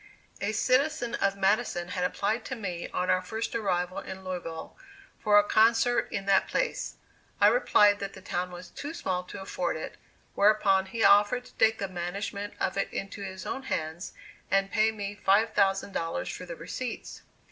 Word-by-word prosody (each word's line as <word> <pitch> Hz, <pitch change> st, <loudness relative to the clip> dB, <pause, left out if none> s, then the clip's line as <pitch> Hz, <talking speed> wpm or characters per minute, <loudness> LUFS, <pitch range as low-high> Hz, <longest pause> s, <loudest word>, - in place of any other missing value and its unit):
A 200 Hz, +2 st, 0 dB
citizen 255 Hz, +3 st, +1 dB
of 200 Hz, 0 st, 0 dB
Madison 195 Hz, -3 st, +1 dB
had 180 Hz, -1 st, -2 dB
applied 215 Hz, +5 st, 0 dB
to 265 Hz, -, -4 dB
me 180 Hz, -7 st, -4 dB
on 180 Hz, -, 0 dB
our 185 Hz, -, +2 dB
first 220 Hz, +5 st, -4 dB
arrival 185 Hz, -5 st, -1 dB
in 190 Hz, 0 st, -8 dB
Louisville, 175 Hz, -3 st, -6 dB, 0.4 s
for 210 Hz, -1 st, +4 dB
a 205 Hz, -, +7 dB
concert 225 Hz, +3 st, +3 dB
in 195 Hz, -, -3 dB
that 195 Hz, -1 st, +3 dB
place. -, -, -1 dB, 0.4 s
I 205 Hz, -, +5 dB
replied 210 Hz, -2 st, +5 dB
that 195 Hz, 0 st, -5 dB
the 190 Hz, -, -11 dB
town 180 Hz, -1 st, -2 dB
was 180 Hz, 0 st, -10 dB
too 290 Hz, +3 st, -6 dB
small 185 Hz, -, -2 dB
to 200 Hz, -, -8 dB
afford 175 Hz, -3 st, -2 dB
it, 155 Hz, -, -7 dB, 0.4 s
whereupon 200 Hz, -2 st, +4 dB
he 225 Hz, +3 st, -2 dB
offered 205 Hz, +5 st, +5 dB
to -, -, -16 dB
take 220 Hz, 0 st, +3 dB
the 195 Hz, -, -3 dB
management 195 Hz, +3 st, -4 dB
of 185 Hz, -, -1 dB
it 195 Hz, -, -1 dB
into 195 Hz, +1 st, -5 dB
his 190 Hz, -1 st, -6 dB
own 270 Hz, -, -3 dB
hands, 165 Hz, -8 st, -4 dB, 0.4 s
and 195 Hz, 0 st, +2 dB
pay 215 Hz, +1 st, +3 dB
me 205 Hz, -1 st, -6 dB
$5,000 195 Hz, -, +1 dB
for 180 Hz, -, -9 dB
the 170 Hz, -, -6 dB
receipts. 230 Hz, +9 st, -6 dB
200 Hz, 175 wpm, -28 LUFS, 185-220 Hz, 0.4 s, a